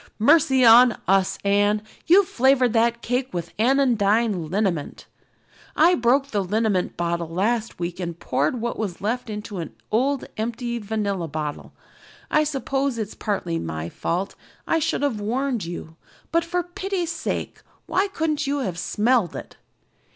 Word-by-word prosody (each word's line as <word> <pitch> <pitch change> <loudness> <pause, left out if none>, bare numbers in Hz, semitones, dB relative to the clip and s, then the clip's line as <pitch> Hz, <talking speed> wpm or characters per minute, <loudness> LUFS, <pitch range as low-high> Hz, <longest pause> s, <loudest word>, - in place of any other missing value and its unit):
"Mercy 265 +1 +4
on 235 +1 +7
us, 195 0 +2
Anne, 205 +1 +3 0.3
you've 370 +3 +6
flavored 260 - +3
that 235 0 +2
cake 250 +2 -1
with 170 -2 -5
Anodyne 225 - +2
Liniment. 185 -5 -2 0.7
I 335 +4 +5
broke 270 0 +2
the 205 -5 0
liniment 205 -1 0
bottle 170 -1 -2
last 215 +6 -1
week 175 +1 -4
and 170 -2 -4
poured 145 - 0
what 235 +1 -3
was 200 -5 -3
left 230 +4 -2
into 210 -2 -5
an 165 - -6 0.2
old 265 +5 +1
empty 235 +2 -3
vanilla 200 -5 -2
bottle. 150 -1 -5 0.6
I 305 0 +3
suppose 275 -2 -1
it's 215 -2 -4
partly 200 - -2
my 80 0 -4
fault 180 - -3 0.3
I 330 - +1
should 320 -2 -1
have 240 -8 0
warned 245 0 -1
you 165 -1 -8 0.3
but 335 0 +2
for 350 +1 -1
pity's 355 -1 -3
sake 325 -1 -4 0.2
why 385 +2 +1
couldn't 315 -6 -1
you 285 +1 0
have 180 -8 -3
smelled 220 -1 +1
it?" - - -9
225 Hz, 150 wpm, -23 LUFS, 190-270 Hz, 0.7 s, on